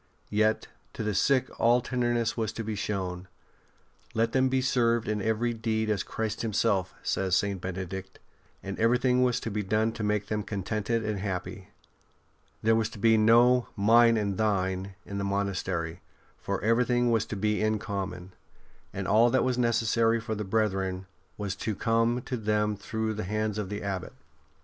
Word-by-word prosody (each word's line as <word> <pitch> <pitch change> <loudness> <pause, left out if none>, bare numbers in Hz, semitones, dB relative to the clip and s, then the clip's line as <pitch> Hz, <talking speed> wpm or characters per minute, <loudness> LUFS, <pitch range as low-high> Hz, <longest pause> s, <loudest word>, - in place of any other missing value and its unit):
Yet 110 +1 +2 0.3
to - - -4
the 105 -1 -1
sick 130 +5 +2
all 120 +2 +5
tenderness 120 -2 0
was 110 -2 -1
to 115 - -4
be 110 0 -3
shown. 95 -3 -3 0.4
*' - - -33
Let 115 +1 +2
them 130 0 +2
be 130 0 +2
served 120 -3 +1
in 105 0 0
very 110 +3 0
deed 110 -1 -1
as 100 -4 0
Christ 110 -1 -3
Himself," 100 -4 0
says 95 -2 +1
St. 100 -2 0
Bene 95 +1 -4
dict; 95 +1 -8 0.5
and 95 0 -5
everything 125 +2 +3
was 125 -1 +2
to 115 - -4
be 105 +1 -1
done 110 +3 +1
to 115 - -7
make 105 -1 0
them 105 0 -2
contented 110 +3 -2
and 105 -2 -2
happy. 95 +1 -4 1.0
There 110 +1 +4
was 110 -1 +1
to 115 - -11
be 110 +2 +4
no 120 +3 +5
'' - - -36
mine 115 +2 +5
and 100 -1 -1
thine 95 -2 0
" - - -37
in 100 0 -5
the - - -2
monastery, 95 -4 -2 0.3
for - - -3
everything 120 +2 +2
was 110 -2 +1
to - - -4
be 105 +1 0
in 110 0 +2
common, 95 -3 -5 0.6
and 100 -1 -4
all 115 +3 +5
that 130 - +2
was 125 -1 0
necessary 115 -1 +2
for 110 0 -4
the 105 0 -3
brethren 95 -3 -1 0.3
was 100 -2 -3
to 110 +1 -2
come 115 +3 +1
to 125 - -3
them 105 -1 0
through 110 +2 -3
the 110 0 -4
hands 105 +2 -2
of 100 -3 -3
the 105 0 -5
Abbot. 95 -3 -4
110 Hz, 185 wpm, -28 LUFS, 100-115 Hz, 1.0 s, all